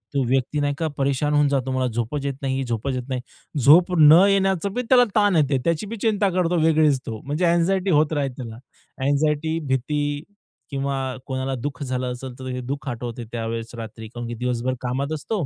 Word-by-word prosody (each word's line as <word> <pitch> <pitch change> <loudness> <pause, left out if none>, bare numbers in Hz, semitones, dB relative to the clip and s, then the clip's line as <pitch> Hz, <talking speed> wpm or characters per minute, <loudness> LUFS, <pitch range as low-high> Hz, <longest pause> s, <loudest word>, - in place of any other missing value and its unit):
तो 140 - +2
व्यक्ती 130 +3 0
नाही 145 0 +1
का 165 -1 -1
परेशान 140 +2 0
होऊन 145 0 +4
जातो. 135 -2 0
मला 130 0 0
झोपच 120 +5 -3
येत 140 - -1
नाही, 135 -1 -1
झोपच 120 +2 -2
येत 125 - -3
नाही. 130 -1 -2 0.4
झोप 165 +8 +6
न 155 +4 +8
येण्याचं 195 -1 +1
बी 250 - -1
त्याला 250 -1 +7
ताण 205 -4 +4
येते. 145 -3 +3
त्याची 170 +4 0
बी 230 - -5
चिंता 210 -3 +2
करतो 180 -1 +1
वेगळीच 155 -3 +3
तो. 110 -1 -5
म्हणजे 150 +6 0
अँक्साइटी 175 +3 +2
होत 155 0 +3
राहील 140 -3 0
त्याला. 115 -3 -7 0.5
अँक्साइटी, 150 +3 +1
भीती 145 +3 -1 0.5
किंवा 140 -1 -2 0.3
कोणाला 130 0 -3
दुःख 130 +2 -5
झालं 125 -1 -2
असेल, 125 +1 -7
तर 130 -1 -4
दुःख 140 +1 -4
आठवते 120 0 -5
त्यावेळेस 115 0 -4
रात्री, 110 -1 -8
कारण 120 +1 -7
की 120 - -5
दिवसभर 125 +1 -1
कामात 130 +4 -2
असतो. 170 +4 -2
140 Hz, 190 wpm, -23 LUFS, 125-160 Hz, 0.5 s, न